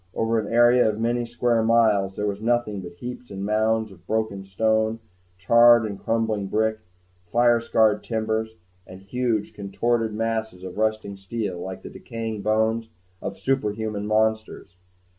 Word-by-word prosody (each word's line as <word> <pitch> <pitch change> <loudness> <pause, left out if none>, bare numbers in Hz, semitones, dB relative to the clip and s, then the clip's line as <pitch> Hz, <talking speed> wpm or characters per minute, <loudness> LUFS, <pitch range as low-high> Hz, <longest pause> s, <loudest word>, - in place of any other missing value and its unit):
Over 115 0 +1
an 105 -1 -5
area 120 0 +5
of 105 0 -3
many 120 +1 0
square 120 0 +1
miles, 110 -4 +3
there 105 - -2
was 100 0 -3
nothing 115 -3 0
but 90 -1 -9
heaps 125 +5 -8
and 100 0 -5
mounds 110 +1 +1
of 90 -2 -18
broken 110 -3 -1
stone, 110 +3 0 0.4
charred 120 +3 +6
and 100 -2 -5
crumbling 110 -3 -1
brick, 110 +2 0 0.5
fire 120 +3 +3
scarred 110 -2 +2
timbers, 110 0 -2 0.3
and 95 +1 -11
huge 115 0 -1
contorted 110 +2 -1
masses 110 -4 -2
of 95 +2 -7
rusting 110 -2 -1
steel 95 -2 -4
like 95 +1 -7
the - - -8
decaying 115 -2 -6
bones 110 +2 0 0.3
of 100 - -5
superhuman 105 -3 -2
monsters. 110 -3 -1
110 Hz, 150 wpm, -24 LUFS, 100-115 Hz, 0.5 s, charred